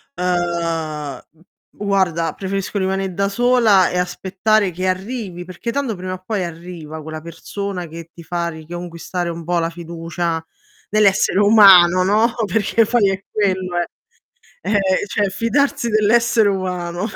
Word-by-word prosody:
ehm, 165 -5 -2 0.5
guarda 185 -6 0
preferisco 195 +1 -3
rimane' 190 -1 -1
da 200 +2 0
sola 230 -4 +4
e 180 - -2
aspettare 190 +3 0
che 185 +2 -4
arrivi, 185 -2 -3
perché 185 +6 -5
tanto 270 -6 -2
prima 185 +1 -5
o 185 0 -9
poi 205 -4 -1
arriva 165 -2 -8
quella 155 0 -7
persona 180 +2 -6
che 165 +1 -10
ti 170 - -12
fa 170 0 -2
riconquistare 170 +2 -5
un 165 0 -6
po' 175 0 +1
la 165 0 0
fiducia 170 0 -4 0.5
nell'essere 200 -2 +3
umano, 195 -4 +7
no. 215 +5 +2
Perché 225 +2 +2
poi 210 -4 +3
è 190 0 -4
quello, 185 -4 -1
eh. 175 - 0 0.8
Ehm, 210 - -1 0.3
cioè 205 0 0
fidarsi 235 +4 0
dell'essere 220 0 +3
umano. 180 0 -3
185 Hz, 135 wpm, -19 LUFS, 170-205 Hz, 0.8 s, umano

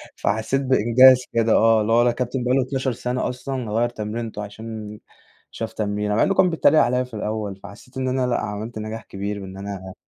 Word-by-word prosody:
فحسيت 110 +6 0
بإنجاز 130 0 +5
كده، 115 -1 +2
آه 115 0 +4
اللي 105 +1 -1
هو 120 - +5
الكابتن 125 +1 -2
بقى 125 +1 +2
له 135 - +3
12 130 0 -2
سنة 125 +1 -2
أصلًا 125 -2 -5
غيّر 115 +3 +1
تمرينته 110 -1 -5
عشان 105 0 -8 0.5
شاف 115 - -5
تمرينة، 105 0 -1
مع - - +3
إنه 195 - +2
كان 185 -1 +4
بيتريق 160 -2 +4
عليّا 125 +1 +2
في 125 -1 -14
الأول، 105 -2 -3
فحسيت 100 +6 -12
إن 130 0 -1
أنا 130 0 0
لأ، 120 - 0
عملت 110 +2 -5
نجاح 110 +1 -6
كبير 100 +1 -5
وإن 95 0 -9
أنا 95 -1 -7
115 Hz, 195 wpm, -22 LUFS, 105-125 Hz, 0.5 s, بإنجاز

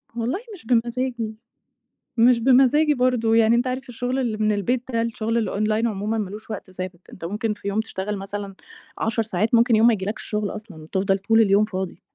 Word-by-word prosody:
والله 240 - -1 0.2
مش 340 - -16
بمزاجي، 235 -1 -1 0.8
مش 235 +1 +5
بمزاجي 270 +5 +4
برضو، 250 -3 +1
يعني 225 0 +5
أنت 245 +2 +1
عارف 255 0 -4
الشغل 245 +2 -2
اللي 230 -4 -1
من 215 0 +2
البيت 235 +5 0
ده، 230 -1 +1
الشغل 230 0 -1
الonline 215 +2 0
عمومًا 210 +1 -2
ما 205 -3 -2
لوش 215 +2 -10
وقت 190 -2 -7
ثابت، 185 -1 -7
أنت 165 - -9
ممكن 210 +4 -2
في 205 - -9
يوم 200 +2 0
تشتغل 210 -2 -3
مثلًا 195 0 -6 0.4
10 225 +1 0
ساعات، 215 +2 -1
ممكن 235 0 +4
يوم 225 +2 +5
ما 235 - +5
يجيلكش 205 +1 -3
شغل 210 -2 -2
أصلًا، 210 -5 -9
وتفضَل 195 +4 0
طول 225 +3 +3
اليوم 205 0 +4
فاضي. 190 -3 -5
220 Hz, 195 wpm, -23 LUFS, 205-235 Hz, 0.8 s, مش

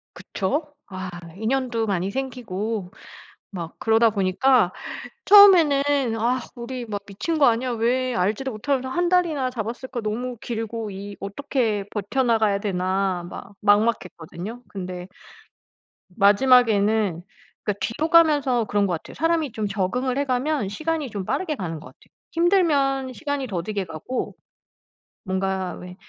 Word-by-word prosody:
그쵸? 290 - -3 0.2
아 185 -1 -5 0.3
인연도 230 +1 -1
많이 190 -2 -1
생기고 220 -6 -4 0.6
막 170 -4 -6
그러다 225 0 +4
보니까 200 +2 +3 0.6
처음에는 290 - +6
'아 245 +3 +1 0.2
우리 245 0 -6
막 205 -2 -4
미친 310 - -3
거 285 - +6
아니야? 245 +2 +2
왜 245 +2 0
알지도 210 +8 0
못하면서 260 +4 -1
1 350 +6 0
달이나 320 -8 +2
잡았을까. 240 +1 -5
너무 235 +3 -3
길고 225 -1 -4
이 200 +1 -8
어떻게 215 -1 -1
버텨 210 +6 -1
나가야 220 -4 +2
되나.' 185 -2 -1
막 200 - -10
막막했거든요. 205 0 0
근데 180 -2 -6 1.1
마지막에는 210 -4 +4 0.4
그러니까 205 -1 -2
뒤로 305 +8 -2
가면서 290 -8 +4
그런 205 -1 +1
것 180 - -1
같아요. 160 - -8
사람이 325 -4 0
좀 215 -2 -2
적응을 245 +7 -1
해가면 275 -3 0
시간이 310 +5 -2
좀 200 -2 -4
빠르게 320 - -1
가는 170 - -5
것 155 - -13
같아요. - - -17 0.2
힘들면 295 -7 +2
시간이 285 0 -3
더디게 200 0 -3
가고 165 +10 -5 0.9
뭔가 190 -1 -2
왜 180 0 -9
225 Hz, 295 characters per minute, -23 LUFS, 200-270 Hz, 1.1 s, 처음에는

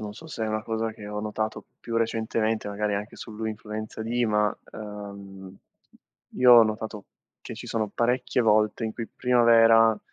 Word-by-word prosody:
non 105 -1 -6
so 160 +8 -12
se 115 -7 -4
è - - -2
una 110 0 -2
cosa 110 0 -2
che 105 -1 -10
ho 105 - -5
notato 110 +1 -3 0.2
più 115 -1 -4
recentemente, 110 -1 -1
magari 105 0 -1
anche 105 +2 -5
sull'influenza 110 0 -6
di 120 +2 0
ma, 105 -1 +1 0.2
ehm, 100 -2 -9 0.8
io 125 -1 +7
ho 120 -1 +10
notato 110 -1 -3 0.3
che - - -8
ci - - -9
sono 110 -2 -1
parecchie 125 +1 0
volte 110 +1 +2
in 110 - -3
cui 115 -1 -6
primavera, 115 -3 +5
110 Hz, 165 wpm, -26 LUFS, 105-115 Hz, 0.8 s, ho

